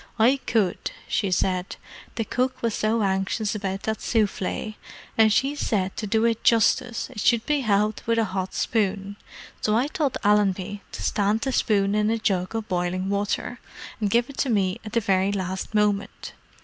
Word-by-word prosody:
"I 250 +5 +4
could," 210 -6 +1 0.2
she 200 - 0
said. 185 0 0 0.4
"The 225 - -1
cook 255 +2 -1
was 230 -2 +1
so 215 +1 +1
anxious 195 +3 0
about 195 -2 -3
that 220 0 -2
souffle, 215 -1 -1 0.4
and 220 -1 +5
she 270 +6 +2
said 195 -9 -1
to 215 - -3
do 220 +3 +2
it 230 -1 0
justice 230 +1 +2
it 210 - -8
should 235 +2 +3
be 295 -1 +1
helped 215 -3 0
with 230 0 +2
a 225 - +3
hot 190 -2 -3
spoon. 200 -2 -1 0.5
So 215 +1 +2
I 245 - +2
told 295 -4 -1
Allenby 205 -1 +2
to - - -6
stand 210 +2 +1
the 265 - -1
spoon 200 -5 +2
in 210 0 +2
a 225 - +1
jug 195 -2 -1
of 220 -1 -3
boiling 180 +1 -1
water, 205 +4 -2 0.4
and 210 -2 0
give 235 +4 +2
it 280 - -11
to 275 - +1
me 195 -4 +1
at 215 - -9
the 230 - +2
very 195 -1 +2
last 190 +1 -3
moment. 205 -1 0
210 Hz, 185 wpm, -25 LUFS, 195-230 Hz, 0.5 s, and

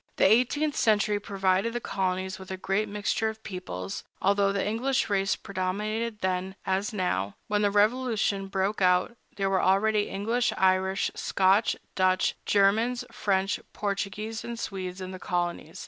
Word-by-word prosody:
The - - +3
eighteenth 255 +8 +3
century 210 -1 +2
provided 195 +2 0
the 240 - -1
colonies 190 -3 -2
with 190 - -10
a 190 - -4
great 195 +3 -1
mixture 210 +2 0
of 220 0 -9
peoples, 95 - -6 0.2
although 200 0 +3
the 200 0 -1
English 250 +2 0
race 195 0 +2
predominated 210 +4 -3
then, 185 0 -1
as 195 +2 0
now. 100 - -1
When 210 0 0
the 205 - +3
Revolution 210 -2 +1
broke 195 +1 -1
out, 180 +5 +3 0.2
there 195 -1 0
were 195 -1 +2
already 205 +2 +2
English, 225 +5 0
Irish, 190 +1 +2
Scotch, 195 +3 +2 0.2
Dutch, 185 -1 +2
Germans, 220 +5 +3
French, 195 0 0
Portuguese, 210 +2 -3
and 235 0 -5
Swedes 185 -3 -5
in 185 0 -5
the 185 - -8
colonies. 175 -3 -3
195 Hz, 150 wpm, -27 LUFS, 190-215 Hz, 0.2 s, The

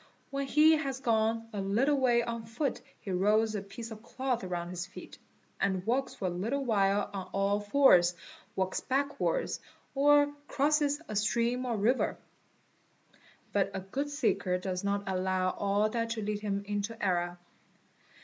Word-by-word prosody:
When 275 0 -2
he 310 +3 +6
has 270 -3 -3
gone 225 -2 +1
a 205 - -2
little 225 +9 +2
way 245 -3 +3
on 230 -1 -5
foot 245 +4 -2 0.2
he 195 - -5
rolls 210 +4 +2
a 205 - -2
piece 225 +4 -9
of 215 -1 -8
cloth 250 0 -2
round 175 -1 -3
his 180 0 -4
feet, 185 - -11 0.4
and 190 -1 0
walks 255 +4 0
for 195 - -5
a 180 - 0
little 230 +11 -2
while 200 -3 +2
on 190 -2 -5
all 200 +1 +1
fours, 205 -6 +5 0.4
walks 190 0 0
backwards, 285 - -1 0.3
or 290 +1 +4
crosses 290 0 +2
a 215 - -5
stream 235 +4 +1
or 235 -2 -1
river. 235 +6 +1 1.4
But 195 -1 +2
a - - -1
good 265 +10 -3
seeker 200 -10 0
does 180 0 -3
not 200 0 0
allow 185 -1 0
all 205 +2 +1
that 230 +1 -2
to 225 -2 -3
lead 210 0 -2
him 200 -1 -2
into 205 +2 -3
error. 175 -2 0
215 Hz, 160 wpm, -30 LUFS, 195-260 Hz, 1.4 s, he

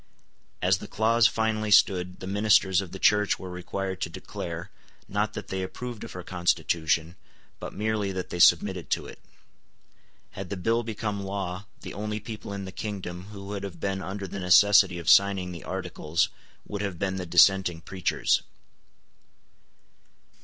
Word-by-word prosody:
As 90 +1 +3
the - - -8
clause 115 +2 +4
finally 110 -1 -1
stood, 90 -3 +3
the - - -5
ministers 100 -2 +3
of 95 - -8
the 95 - -6
Church 105 +1 +3
were 95 -1 -8
required 95 +1 -4
to - - -1
declare, - - -7 0.4
not 105 +1 -1
that 105 - -7
they 95 0 -2
approved 120 +4 -6
of - - -8
her 90 - -7
constitution, 85 -1 0 0.4
but - - -6
merely 105 -1 -1
that 95 -1 -5
they 90 - -4
submitted 90 +1 +4
to - - 0
it. - - -11 1.1
Had 95 -2 -7
the 100 - -4
bill 115 +6 +1
become 105 -3 -3
law, 95 -1 -4 0.2
the - - -7
only 105 +1 -3
people 110 -1 -8
in 100 -1 -5
the 95 - -7
kingdom 95 -4 -5
who 100 -1 -10
would 100 0 -5
have 90 -4 -7
been 95 +2 -2
under 95 +2 -5
the 100 - -6
necessity 95 0 +6
of 85 -2 -8
signing 95 -2 +5
the 85 -2 -8
Articles 80 +3 -1 0.4
would 100 -1 -4
have 100 -4 -3
been 95 +1 -2
the 90 -1 -4
dissenting 95 -1 +5
preachers. 95 +2 0
95 Hz, 165 wpm, -27 LUFS, 90-105 Hz, 1.1 s, necessity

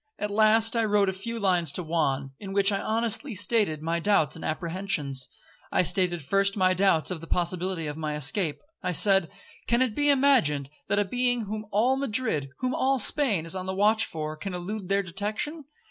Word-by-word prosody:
At 210 0 -4
last 220 +2 +4
I 230 - +1
wrote 205 -2 +2
a - - -3
few 230 +5 -6
lines 180 -6 +1
to 180 - -2
Juan, 145 -5 -1
in 195 -1 -8
which 200 0 +4
I 200 - -2
honestly 230 +3 0
stated 195 -6 +1
my 165 +1 -1
doubts 170 -6 +1
and 160 - -10
apprehensions. 155 -5 -1 0.4
I - - +2
stated 175 -2 0
first 195 +7 +1
my 185 -1 +3
doubts 185 -5 +2
of 170 -3 -5
the 165 - -10
possibility 180 0 -1
of 150 0 -5
my 155 -1 -4
escape. 150 +3 0 0.2
I 180 - -2
said, 195 -1 +4 0.4
'Can 235 +2 +3
it 245 -4 -2
be 290 +4 0
imagined 250 - +2 0.2
that 205 - 0
a 205 - +2
being 245 +3 0
whom 215 0 -6
all 235 +6 +1
Madrid, 220 - -1
whom 255 0 -2
all 270 +1 +1
Spain, 225 - +3
is 165 - -1
on 185 0 -5
the 190 - -3
watch 215 +3 +2
for, 155 -1 -5
can 180 +4 -6
elude 190 +2 -6
their 200 0 +1
detection? 215 - -3
195 Hz, 200 wpm, -26 LUFS, 165-220 Hz, 0.4 s, last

